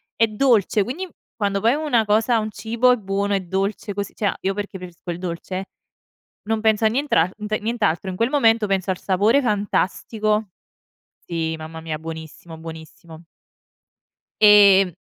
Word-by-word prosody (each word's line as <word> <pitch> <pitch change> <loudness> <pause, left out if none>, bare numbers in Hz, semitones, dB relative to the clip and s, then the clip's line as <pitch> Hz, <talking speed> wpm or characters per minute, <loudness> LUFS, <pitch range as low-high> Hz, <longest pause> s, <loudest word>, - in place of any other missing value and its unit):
è 225 - +3
dolce 215 -2 +2
quindi 320 - -5 0.3
quando 200 -2 -1
poi 230 +3 +3
una 290 -7 +1
cosa, 220 +3 +2
un 215 0 -4
cibo 235 +4 +1
è - - +4
buono, 200 -1 -2
è 195 - +2
dolce 195 +3 -3
così 200 -1 -4
cioè 215 - -4
a - - -1
io 195 - 0
perché 205 -1 -5
preferisco 180 -1 -11
il 170 - -3
dolce 185 +2 -5 0.8
non 220 +1 -1
penso 220 0 +2
a - - +6
nientrante 215 - 0
nient'altro. 215 -5 -1
In - - -5
quel 230 +4 +1
momento 225 -6 +3
penso 195 -1 -1
al 185 - -2
sapore 205 +8 +2
fantastico. 210 -1 -1 0.8
Sì, 165 -1 -2
mamma 160 +1 -8
mia, 160 -1 -4
buonissimo, 160 +1 -9
buonissimo. 160 +1 -11 1.2
Ehm, 200 -3 +7
205 Hz, 155 wpm, -22 LUFS, 180-220 Hz, 1.2 s, Ehm